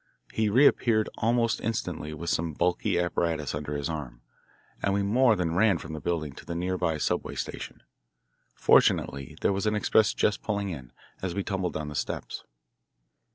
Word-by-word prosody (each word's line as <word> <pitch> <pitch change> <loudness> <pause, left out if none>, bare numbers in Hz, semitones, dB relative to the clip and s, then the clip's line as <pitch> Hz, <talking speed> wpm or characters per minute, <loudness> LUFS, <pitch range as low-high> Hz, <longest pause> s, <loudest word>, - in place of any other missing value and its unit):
He 110 -1 +1
reappeared 115 -2 +4
almost 115 0 +2
instantly 105 -8 -3
with 80 +2 -3
some 85 -1 -1
bulky 85 +3 +1
apparatus 85 -4 -1
under 75 0 -4
his 70 - -2
arm, 65 -7 -6 0.6
and 100 -1 +1
we 100 - +1
more 115 +3 +4
than 85 -4 -1
ran 100 0 +4
from 80 - -8
the 80 - -5
building 80 -5 -2
to - - -9
the 85 - -5
near 90 +2 -1
by 85 -4 0
subway - - -1
station. - - -6 0.7
Fortunately 70 -2 +3
there - - +2
was 100 +2 -1
an 105 - +2
express 105 0 +3
just 105 - +1
pulling 100 -2 -2
in, 65 -8 -7 0.3
as 90 -2 -3
we 100 - -1
tumbled 95 -3 -2
down 75 -1 -3
the - - -7
steps. - - -4
90 Hz, 175 wpm, -28 LUFS, 75-105 Hz, 0.7 s, reappeared